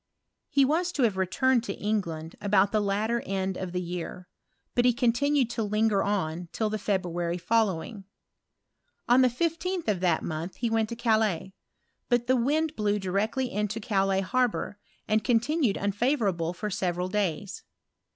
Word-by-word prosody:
He 280 -3 +4
was 340 +6 +1
to 275 - +1
have 220 -5 +2
returned 230 +7 +2
to 195 - -4
England 170 -7 -3
about 200 -1 +3
the 215 - +2
latter 215 +4 0
end 190 -1 -2
of 185 -1 -5
the 180 - -2
year; 180 0 -5 0.5
but 245 - +2
he 245 0 +4
continued 255 +2 +2
to 235 - -2
linger 210 -1 +2
on 175 -4 -2
till 215 -2 -1
the 215 - -2
February 175 -4 -1
following. 195 +1 0 1.0
On 245 +2 +6
the 255 - +6
15th 335 +6 -2
of 205 -4 +1
that 175 -3 +1
month 165 +3 -4
he 235 -2 -2
went 225 -1 +1
to 235 - -4
Calais; 220 -6 +1 0.6
but 240 -1 +2
the 255 - +3
wind 305 +6 +1
blew 210 -1 +1
directly 215 +7 -1
into 210 +1 -2
Calais 195 -3 +1
harbour, 230 0 -1 0.3
and 215 0 +2
continued 245 0 +2
unfavourable 200 - 0
for 210 +4 -5
several 180 -1 -1
days. 195 -1 -2
210 Hz, 160 wpm, -27 LUFS, 190-240 Hz, 1.0 s, On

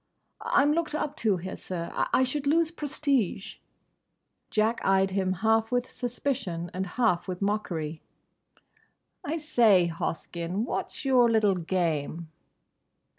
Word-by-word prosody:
"I'm 285 +1 +3
looked 320 -2 -1
up 300 -1 -2
to 210 -4 +1
here, 185 +2 -6
sir. 170 -2 -5 0.2
I 260 - +4
should 280 +2 -2
lose 325 +2 +3
prestige." 280 - -1 0.9
Jack 220 +2 +1
eyed 195 0 +3
him 190 -1 0
half 225 +1 +3
with 245 0 0
suspicion 235 -9 -3
and 190 +2 -2
half 225 -9 +2
with 180 -1 -4
mockery. 170 -7 -2 1.2
"I 315 +3 -2
say, 220 - +4
Hoskyn, 170 +4 -3
what's 275 - -4
your 250 -3 +5
little 215 -3 +3
game?" 170 -3 -2
210 Hz, 125 wpm, -27 LUFS, 180-260 Hz, 1.2 s, your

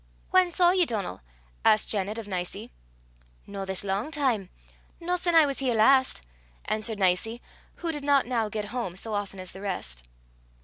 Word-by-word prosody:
"Whan 370 -1 +5
saw 350 0 +4
ye 365 -2 +3
Donal?" 200 - -3 0.4
asked 215 0 +4
Janet 205 +1 -1
of 225 -2 -6
Nicie. 180 -2 -4 0.7
"No 200 -1 -6
this 190 0 -2
lang 200 +7 -1
time 260 - 0 0.5
no 355 +1 -1
sin 350 -1 +1
I 320 -2 +8
was 275 -1 -2
here 255 -3 +1
last," 260 - +4 0.4
answered 215 0 -1
Nicie, 195 +5 +1 0.4
who 335 -1 -3
did 295 -2 -5
not 280 -1 +4
now 230 -3 0
get 210 -1 -4
home 235 -8 -3
so 215 +3 -5
often 200 -2 -3
as 185 -1 -5
the 190 - -10
rest. 60 - -4
220 Hz, 175 wpm, -27 LUFS, 195-280 Hz, 0.7 s, I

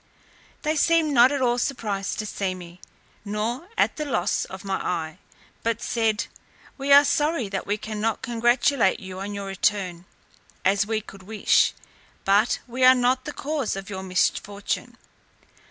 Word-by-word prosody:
They 310 +1 +1
seemed 320 -1 +3
not 250 +1 +6
at 280 -2 0
all 240 0 +2
surprised 210 -7 -2
to 215 - -3
see 195 -2 -2
me, 175 0 -12 0.4
nor 220 - -3
at - - +2
the 305 - -2
loss 200 -9 0
of 190 +1 -9
my 195 -1 -1
eye; 165 -1 -3 0.4
but 230 0 -1
said, 225 -2 0 0.5
"We 275 +1 -2
are 285 +1 +9
sorry 295 -6 +1
that 195 -1 -4
we 205 +1 0
cannot 215 0 -3
congratulate 240 -1 +2
you 185 -1 -8
on 205 +1 -5
your 200 0 -5
return, 195 -2 -1 0.6
as 200 +1 +3
we 220 -1 -1
could 195 -2 -13
wish; 210 +2 +2 0.5
but 205 +4 +3
we 255 +1 -3
are 255 0 +8
not 255 +1 +1
the - - -4
cause 290 -7 -2
of 195 +1 -7
your 190 -1 -4
misfortune." 200 +2 -1
215 Hz, 160 wpm, -24 LUFS, 195-255 Hz, 0.6 s, are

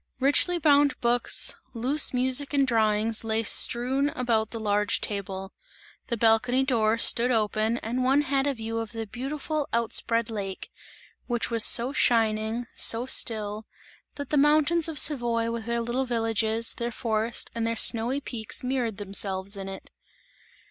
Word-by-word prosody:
Richly 290 +6 +3
bound 285 -4 +2
books, 240 -1 +1 0.2
loose 265 +6 +2
music 260 +3 +1
and 275 -1 +2
drawings 220 -2 +1
lay 225 0 -2
strewn 255 +6 +3
about 230 -5 -2
the 230 - -6
large 210 -1 0
table; 195 -2 -5 0.5
the 235 - -3
balcony 235 +4 +2
door 230 -4 0
stood 235 +1 +3
open 220 0 0
and 245 +3 -3
one 270 +3 +2
had 275 0 -1
a 280 - -1
view 225 0 -5
of 225 0 -7
the 225 -1 -5
beautiful 280 +6 -5
out 230 -1 -2
spread 230 -1 0
lake, 195 -3 -6 0.6
which 240 -1 -2
was 230 -2 +4
so 245 +3 +6
shining, 225 -1 0
so 230 +2 +2
still, 215 -4 +1 0.5
that 285 - -8
the 300 - +1
mountains 305 +3 +3
of 320 -2 -5
Savoy 235 -6 +1
with 230 -1 -6
their 235 0 -2
little 240 +3 -3
villages, 225 -1 0
their 235 0 -4
forest 230 -1 -2
and 230 -1 -3
their 230 - -2
snowy 235 +4 +1
peaks 235 -6 -3
mirrored 250 -5 -3
themselves 195 -1 -3
in 195 -1 -7
it. 190 - -11
230 Hz, 155 wpm, -25 LUFS, 220-260 Hz, 0.6 s, so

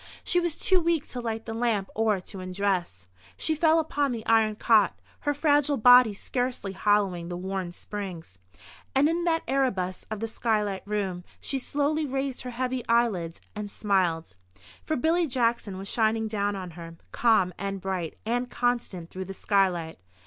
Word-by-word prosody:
She 355 - +3
was 345 -3 -1
too 375 -1 +3
weak 335 -3 0
to 250 - -4
light 225 -1 -3
the 225 - -4
lamp 225 -4 0
or 220 -3 +1
to 190 +2 -9
undress. 185 - -2 0.3
She 315 - 0
fell 315 +1 +4
upon 290 -3 0
the 230 -2 -5
iron 220 -1 +3
cot, 215 -4 +3 0.2
her 290 - 0
fragile 290 -1 +3
body 245 0 +8
scarcely 245 -3 -3
hollowing 190 -3 +1
the 175 - -4
worn 190 -1 -3
springs. 175 - -7 0.6
And 275 +2 +5
in 340 +2 0
that 330 -1 +1
Erebus 195 -10 0
of 215 -1 -4
the 225 - -2
skylight 215 -4 -1
room, 195 -4 -2 0.2
she 270 - -3
slowly 295 +3 0
raised 270 -1 -2
her 255 - -6
heavy 250 0 -2
eyelids, 210 -8 +1 0.2
and 210 -1 -5
smiled. 180 - 0 0.5
For 310 - -1
Billy 325 +5 +2
Jackson 235 -6 0
was 195 +1 -7
shining 220 0 +1
down 205 -1 -1
on 185 -2 -6
her, 165 0 -10 0.2
calm 220 -6 +3
and 195 0 -3
bright 185 -4 -3
and 245 +2 -1
constant 235 -10 -2
through 190 0 -5
the 195 +1 -7
skylight. 180 -5 +1
215 Hz, 170 wpm, -27 LUFS, 190-255 Hz, 0.6 s, body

